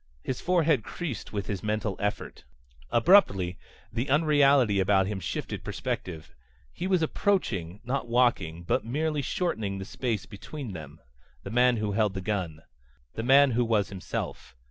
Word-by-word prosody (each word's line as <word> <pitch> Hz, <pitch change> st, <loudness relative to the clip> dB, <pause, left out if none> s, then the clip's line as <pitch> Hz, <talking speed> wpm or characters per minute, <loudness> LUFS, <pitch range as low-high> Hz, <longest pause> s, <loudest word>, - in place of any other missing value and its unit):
His 130 Hz, -, -3 dB
forehead 165 Hz, -, +2 dB
creased 150 Hz, -, -5 dB
with 100 Hz, -2 st, -3 dB
his 100 Hz, -4 st, -4 dB
mental 105 Hz, -1 st, -1 dB
effort. 105 Hz, 0 st, -3 dB, 0.5 s
Abruptly 100 Hz, -, +4 dB, 0.3 s
the 120 Hz, +4 st, -2 dB
unreality 140 Hz, -7 st, +4 dB
about 95 Hz, 0 st, +3 dB
him 100 Hz, 0 st, -3 dB
shifted 90 Hz, -, -4 dB
perspective. 80 Hz, -4 st, -5 dB, 0.4 s
He 180 Hz, -, -3 dB
was 185 Hz, -3 st, +2 dB
approaching 105 Hz, -, -1 dB
not 125 Hz, +1 st, -2 dB
walking, 115 Hz, -9 st, +1 dB
but 85 Hz, -, 0 dB
merely 150 Hz, +5 st, -1 dB
shortening 110 Hz, -, -2 dB
the 95 Hz, -, -5 dB
space 110 Hz, -4 st, -3 dB
between 110 Hz, +5 st, -8 dB
them 80 Hz, -2 st, -9 dB, 0.4 s
the -, -, -7 dB
man 125 Hz, +1 st, +4 dB
who 105 Hz, -1 st, -1 dB
held 105 Hz, -1 st, +1 dB
the -, -, -2 dB
gun. 90 Hz, -6 st, -3 dB, 0.5 s
The -, -, -4 dB
man 135 Hz, +3 st, +6 dB
who 120 Hz, +1 st, +2 dB
was 110 Hz, -4 st, +1 dB
himself. 95 Hz, -9 st, -6 dB
110 Hz, 150 wpm, -28 LUFS, 95-140 Hz, 0.5 s, man